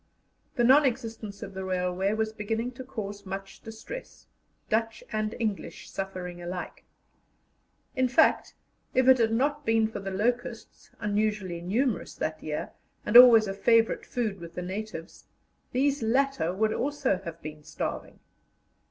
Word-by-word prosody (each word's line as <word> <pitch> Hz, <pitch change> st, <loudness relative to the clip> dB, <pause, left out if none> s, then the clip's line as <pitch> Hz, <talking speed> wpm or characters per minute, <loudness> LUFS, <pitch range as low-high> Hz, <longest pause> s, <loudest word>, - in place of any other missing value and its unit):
The 240 Hz, -, +2 dB
non 270 Hz, +5 st, +7 dB
existence 225 Hz, -5 st, -3 dB
of 195 Hz, -, -8 dB
the 190 Hz, 0 st, -5 dB
railway 185 Hz, +1 st, 0 dB
was 220 Hz, 0 st, -1 dB
beginning 225 Hz, +3 st, -2 dB
to 255 Hz, +1 st, -9 dB
cause 205 Hz, -6 st, -6 dB
much 195 Hz, 0 st, -7 dB
distress, 225 Hz, -, -9 dB, 0.4 s
Dutch 225 Hz, +1 st, -1 dB
and 215 Hz, 0 st, -1 dB
English 215 Hz, -4 st, -3 dB
suffering 180 Hz, -2 st, -5 dB
alike. 175 Hz, +1 st, -6 dB, 1.1 s
In 260 Hz, -1 st, +3 dB
fact, 290 Hz, +6 st, +3 dB, 0.4 s
if 255 Hz, 0 st, +4 dB
it 260 Hz, -1 st, +7 dB
had 225 Hz, -1 st, +3 dB
not 290 Hz, +5 st, +1 dB
been 225 Hz, -3 st, +3 dB
for 220 Hz, -, -6 dB
the 195 Hz, 0 st, -5 dB
locusts, 235 Hz, +4 st, -3 dB
unusually 210 Hz, -4 st, -1 dB
numerous 215 Hz, +4 st, -1 dB
that 155 Hz, 0 st, -3 dB
year, 150 Hz, -1 st, -4 dB, 0.3 s
and 210 Hz, -, -2 dB
always 240 Hz, -3 st, +10 dB
a 195 Hz, -, -2 dB
favourite 225 Hz, +3 st, +2 dB
food 220 Hz, -6 st, -2 dB
with 170 Hz, 0 st, -10 dB
the 180 Hz, -, -4 dB
natives, 190 Hz, -2 st, -7 dB, 0.4 s
these 275 Hz, +2 st, +1 dB
latter 230 Hz, -7 st, +1 dB
would 215 Hz, +4 st, +1 dB
also 275 Hz, -8 st, 0 dB
have 170 Hz, -2 st, -7 dB
been 150 Hz, 0 st, -8 dB
starving. -, -, -5 dB
215 Hz, 145 wpm, -28 LUFS, 190-240 Hz, 1.1 s, always